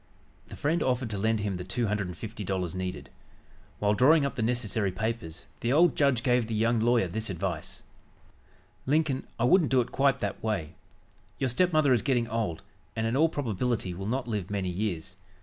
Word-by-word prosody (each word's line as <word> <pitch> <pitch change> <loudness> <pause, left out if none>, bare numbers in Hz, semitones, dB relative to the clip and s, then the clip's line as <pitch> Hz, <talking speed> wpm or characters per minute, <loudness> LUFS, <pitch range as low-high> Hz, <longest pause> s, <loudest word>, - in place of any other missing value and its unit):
The - - -9
friend 160 +4 0
offered 125 -3 0
to 100 - -2
lend 110 +1 +1
him 100 -3 -2
the 90 - -5
two 95 +6 -1
hundred 105 -2 -1
and 90 -2 -8
fifty 110 0 -6
dollars 95 -2 -2
needed. 95 0 -5 0.7
While 105 0 +2
drawing 140 +7 +5
up 140 - -2
the - - -3
necessary 110 -4 0
papers, 95 -5 -4
the 120 - -1
old 165 +4 +5
judge 140 -5 +2
gave 125 -3 +2
the 115 - -3
young 115 +2 +2
lawyer 115 -3 +3
this 110 +5 -4
advice: 90 -3 -4 1.0
"Lincoln, 145 -2 +1
I 115 - -1
wouldn't 160 +4 +4
do 130 - +4
it 120 - -1
quite 135 0 +2
that 100 -1 -3
way. 100 -9 -2 0.6
Your 130 - 0
stepmother 155 0 +3
is 120 - +2
getting 120 -4 +1
old, 110 -7 -2 0.3
and, 110 - -1
in 115 +2 0
all 160 +4 +4
probability, 120 - -2
will 95 +3 -6
not 125 +2 -2
live 105 -6 -3
many 100 -3 -2
years. 90 -1 -3
115 Hz, 195 wpm, -28 LUFS, 95-130 Hz, 1.0 s, drawing